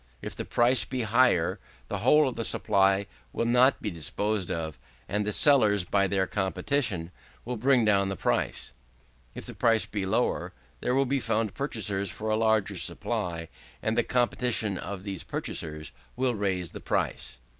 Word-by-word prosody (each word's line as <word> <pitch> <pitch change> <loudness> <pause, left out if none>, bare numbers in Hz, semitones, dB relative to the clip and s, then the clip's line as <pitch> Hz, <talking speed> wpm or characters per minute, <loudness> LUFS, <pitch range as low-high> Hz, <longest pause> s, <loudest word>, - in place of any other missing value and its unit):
If - - -6
the - - -5
price 125 +2 +3
be 125 -2 -3
higher, 110 -6 +2 0.3
the 105 - -3
whole 145 +7 +5
of 130 - -3
the 115 - -3
supply 100 -2 +2 0.3
will - - -1
not 125 +3 +4
be 105 - -2
disposed 95 +5 0
of, 80 -2 -4 0.3
and 105 +1 -1
the - - +1
sellers, 105 -7 +4
by 100 +2 +1
their 95 0 +1
competition, 95 -1 -1 0.3
will 125 +1 -3
bring 125 0 +3
down 100 -2 +3
the 100 - -3
price. - - -2 0.6
If - - -6
the - - -7
price 115 -1 +2
be 100 -3 -4
lower, 115 +5 0 0.3
there 125 - 0
will 135 0 +3
be 135 +2 0
found 110 -4 -1
purchasers 105 -8 -1
for 110 +5 -4
a - - +3
larger 110 -3 +1
supply, 85 -1 -1 0.4
and 110 - 0
the 120 - +4
competition 120 -5 0
of 100 -2 -6
these 100 -3 -5
purchasers 75 -1 -3 0.2
will 130 0 0
raise 95 -5 -2
the - - -9
price. - - -2
105 Hz, 170 wpm, -27 LUFS, 95-120 Hz, 0.6 s, whole